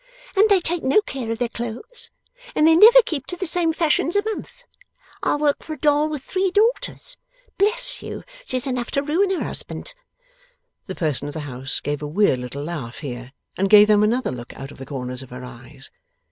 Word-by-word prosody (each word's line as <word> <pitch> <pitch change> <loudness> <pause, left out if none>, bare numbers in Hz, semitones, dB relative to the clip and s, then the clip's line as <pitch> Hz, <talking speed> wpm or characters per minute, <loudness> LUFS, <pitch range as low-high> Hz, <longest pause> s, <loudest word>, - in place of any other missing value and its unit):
'And 415 +3 +5
they 400 -2 +5
take 345 -1 -2
no 270 +9 +4
care 255 - -5
of 225 - -2
their 245 0 0
clothes, 240 - -6 0.5
and 305 - +4
they 320 0 +6
never 470 +7 +9
keep 295 - -4
to 360 - -4
the 375 - -3
same 340 -1 +2
fashions 325 +1 +1
a 405 - +3
month. 440 +3 -6 0.6
I - - +1
work 290 -1 +1
for 315 - -6
a - - -8
doll 295 +1 +3
with 300 -4 -5
three 380 +4 0
daughters. 460 +4 0 0.4
Bless - - +2
you, - - -7 0.2
she's 255 - -2
enough 250 -3 -2
to 280 - +1
ruin 340 +7 +1
her 380 - -1
husband!' - - -5 0.9
The 190 - -5
person 150 -3 -1
of 145 - -7
the 160 - -3
house 135 -1 -4
gave 145 0 -3
a 150 - -4
weird 155 -4 +2
little 125 +3 -6
laugh 145 -8 -6
here, 125 -2 -7 0.2
and 195 +1 0
gave 210 0 +8
them 210 -1 +5
another 235 +5 +1
look 120 -1 -8
out 135 +1 -8
of - - -14
the 135 - -8
corners 125 -2 -5
of 130 - -11
her 125 +1 -9
eyes. 130 +2 -10
250 Hz, 210 wpm, -22 LUFS, -, 0.9 s, never